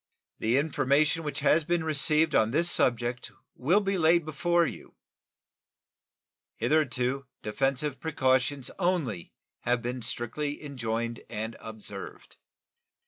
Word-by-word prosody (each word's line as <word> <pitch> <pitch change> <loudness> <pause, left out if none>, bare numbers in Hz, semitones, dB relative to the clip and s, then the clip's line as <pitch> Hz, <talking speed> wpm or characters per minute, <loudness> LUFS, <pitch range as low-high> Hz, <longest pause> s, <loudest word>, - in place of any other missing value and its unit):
The 115 +4 +2
information 150 +2 +2
which 150 -2 -4
has 155 +3 +4
been 170 +1 0
received 155 +1 +3
on 110 - +4
this 170 +7 +3
subject 120 0 +1 0.2
will 175 +11 +2
be 195 -2 -1
laid 165 0 +4
before 170 +3 +1
you. - - -8 1.6
Hitherto 130 0 0 0.2
defensive 135 +5 -1
precautions 130 -3 0
only 175 - -1 0.3
have 120 0 0
been 125 +1 -3
strictly 145 +7 -3
enjoined 115 -4 -3
and 110 +1 -4
observed. 105 -3 -9
140 Hz, 110 wpm, -28 LUFS, 120-160 Hz, 1.6 s, has